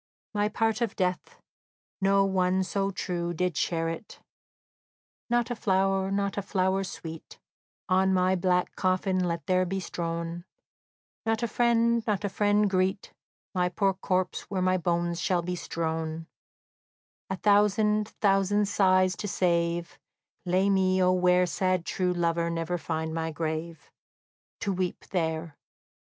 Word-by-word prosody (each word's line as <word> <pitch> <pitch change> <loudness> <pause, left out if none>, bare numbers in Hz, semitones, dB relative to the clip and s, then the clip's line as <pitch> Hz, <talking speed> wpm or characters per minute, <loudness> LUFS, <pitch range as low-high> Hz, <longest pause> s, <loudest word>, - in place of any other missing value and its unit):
My 205 0 +1
part 225 +1 0
of 230 -4 -1
death, 180 -1 -2 0.6
no 195 0 +4
one 190 -1 +1
so 195 +1 -1
true 175 -3 -3
Did 180 0 -1
share 165 +2 0
it. 165 +6 -6 1.1
"Not 240 0 +1
a - - -1
flower, 195 -2 +1
not 200 0 -1
a - - -2
flower 190 0 0
sweet, 165 -3 -8 0.5
On 190 0 +3
my 185 0 +3
black 180 0 +1
coffin 185 0 +1
let 170 -1 -2
there 185 0 +2
be 190 +2 -2
strown; 170 -1 -4 0.8
Not 225 0 0
a - - +1
friend, 235 0 +2
not 210 -2 0
a 205 - 0
friend 205 +1 +2
greet 190 0 0 0.4
My 180 -1 +1
poor 195 +2 +1
corpse, 185 -1 -2
where 195 - -2
my 185 0 +3
bones 170 -1 -1
shall 180 -2 +1
be 180 +1 -3
strown; 160 -1 -3 1.0
A 190 - -1
thousand, 210 +1 +3
thousand 200 0 +2
sighs 185 -2 +3
to 205 - -4
save, 170 -2 0 0.5
Lay 185 +2 +2
me, 190 -1 +2
O 180 - +4
where 180 0 +4
Sad 185 +1 0
true 180 -1 0
lover 170 -1 0
never 170 +1 -2
find 160 -1 -3
my 160 0 -2
grave 160 +1 -4 0.7
To 200 - 0
weep 185 -1 -3
there!" 160 -3 -2
185 Hz, 140 wpm, -28 LUFS, 170-195 Hz, 1.1 s, no